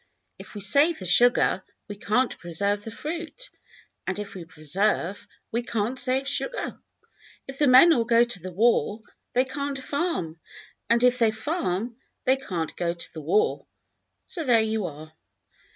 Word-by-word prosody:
If - - -12
we 205 - -6
save 285 - +3
the 185 - -7
sugar, 240 +8 +4 0.2
we 205 - -7
can't 235 +5 0
preserve 200 +4 -1
the 225 - -6
fruit, 335 - -6 0.6
and 190 - -2
if 205 -1 -6
we 180 -3 -8
preserve, 180 +5 -1 0.2
we 235 - 0
can't 235 +2 -2
save 265 +1 +1
sugar. - - -2 0.7
If 270 0 -9
the 295 - +4
men 260 +7 +8
all 235 - +2
go 230 0 +4
to 240 -5 -1
the 185 +2 -7
war, 220 +2 +1 0.3
they 255 +1 +3
can't 280 +1 -4
farm, 275 - -3 0.5
and 235 +1 +3
if 250 0 +4
they 230 -2 +4
farm, 225 - -2 0.3
they 260 +1 +4
can't 175 -11 -4
go 170 -1 -1
to 170 - -4
the 160 - -7
war. 430 - +1 0.6
So 335 - -4
there 235 -5 +4
you 220 -2 -1
are. 155 0 -10
230 Hz, 165 wpm, -25 LUFS, 190-270 Hz, 0.7 s, men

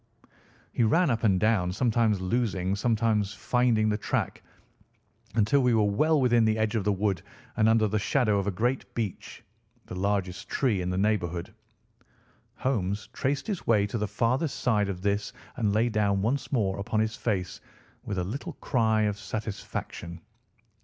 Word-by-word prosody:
He - - -1
ran 160 +7 +3
up 115 0 -1
and 95 -4 +3
down, 105 -4 +2
sometimes 115 -2 +2
losing, 95 -2 0
sometimes 105 -2 +1
finding 115 +1 +2
the 105 0 0
track - - -2 0.9
until 115 +6 +3
we 125 -2 +3
were 110 - +4
well 150 +10 +2
within 120 -3 +4
the 110 0 +2
edge 110 0 0
of 110 -4 0
the 105 - +2
wood 100 -2 0 0.3
and 110 0 +3
under 110 -1 +4
the 105 +1 0
shadow 105 -2 +2
of 100 - -2
a - - +3
great 120 +7 -1
beech, 110 -5 -5 0.4
the - - -9
largest 95 -1 -2
tree 115 -9 +1
in 90 - -2
the 90 - -1
neighbourhood. 90 -4 -1 1.0
Holmes 105 -6 -2
traced 140 +1 -1
his 205 -5 -4
way 105 -3 +4
to 105 +3 -3
the 105 - -1
farther 120 - +1
side 110 -7 0
of 90 -1 -5
this 100 0 -1 0.2
and 110 -4 +1
lay 110 +3 +2
down 100 -3 +1
once 125 +3 -1
more 100 -7 0
upon 105 +2 -1
his 110 +1 0
face 95 -8 -2 0.4
with 100 - -4
a 90 - 0
little 110 +10 -5
cry 110 -4 +1
of 105 -1 -1
satisfaction. 100 -5 -5
110 Hz, 170 wpm, -27 LUFS, 100-115 Hz, 1.0 s, were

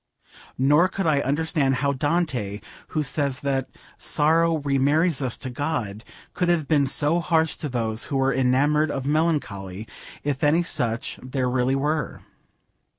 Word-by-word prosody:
Nor 145 +7 +4
could 195 +1 -3
I 155 -3 +3
understand 145 -1 0
how 140 +2 0
Dante, 135 - -1 0.3
who 155 - -1
says 140 -1 -1
that 135 -2 -1 0.3
'sorrow 165 +2 +3
remarries 145 +2 +1
us 130 -3 -2
to 130 - -6
God,' 120 -7 -3 0.3
could 180 -1 0
have 165 -4 +1
been 145 -3 +3
so 150 +5 +2
harsh 160 -2 +1
to 150 - -4
those 115 -3 -2
who 140 - -2
were 135 0 +2
enamoured 145 +4 +2
of 135 -2 -3
melancholy, 115 - -1 0.4
if 145 0 -2
any 155 +4 +4
such 120 -8 -2
there 130 0 -2
really 125 +1 +1
were. 150 +1 -2
140 Hz, 150 wpm, -24 LUFS, 130-155 Hz, 0.4 s, Nor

